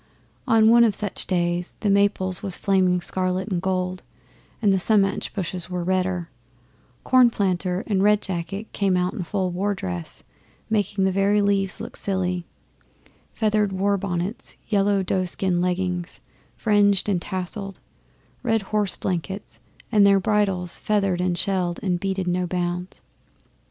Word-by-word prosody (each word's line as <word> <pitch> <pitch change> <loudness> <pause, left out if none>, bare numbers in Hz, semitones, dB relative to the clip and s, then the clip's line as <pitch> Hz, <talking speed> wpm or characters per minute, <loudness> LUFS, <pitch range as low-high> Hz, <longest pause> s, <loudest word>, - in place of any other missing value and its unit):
On 220 -1 +5
one 235 0 +7
of 220 -3 +3
such 205 -3 -3
days 175 -1 -1
the 210 - +1
maples 195 -2 +2
was 190 -3 -4
flaming 185 -2 +2
scarlet 185 +2 -1
and 180 -3 -1
gold, 185 -1 -1 0.6
and 205 -4 +3
the 190 - +2
sumach 200 0 +1
bushes 180 -2 -4
were 180 -1 -3
redder 185 -1 0 0.8
Cornplanter 195 -7 +2
and 195 -3 0
Red 210 +1 +4
Jacket 190 +2 -5
came 195 -2 +1
out 180 0 0
in 215 - -4
full 185 +1 -2
war 200 +3 -1
dress, 90 - -5 0.5
making 205 -2 +1
the 190 - +3
very 200 +2 +2
leaves 200 -1 +1
look - - -7
silly: 185 -3 -2 0.8
feathered 215 -2 +1
war 195 +2 +1
bonnets, 190 +2 -4
yellow 200 -2 +2
doeskin 185 -1 0
leggings, 180 -1 -2 0.4
fringed 205 -3 +3
and 190 -4 +1
tasselled, 190 +2 -5 0.6
red 225 -4 +1
horse 210 -3 +1
blankets, 190 +2 -4 0.3
and 210 -3 +5
their 200 -1 +6
bridles 195 -3 0
feathered 195 -4 +1
and 180 -1 0
shelled 180 -2 0
and 180 -3 0
beaded 190 0 -2
no 180 0 0
bounds. 180 +1 -3
190 Hz, 140 wpm, -23 LUFS, 180-200 Hz, 0.8 s, one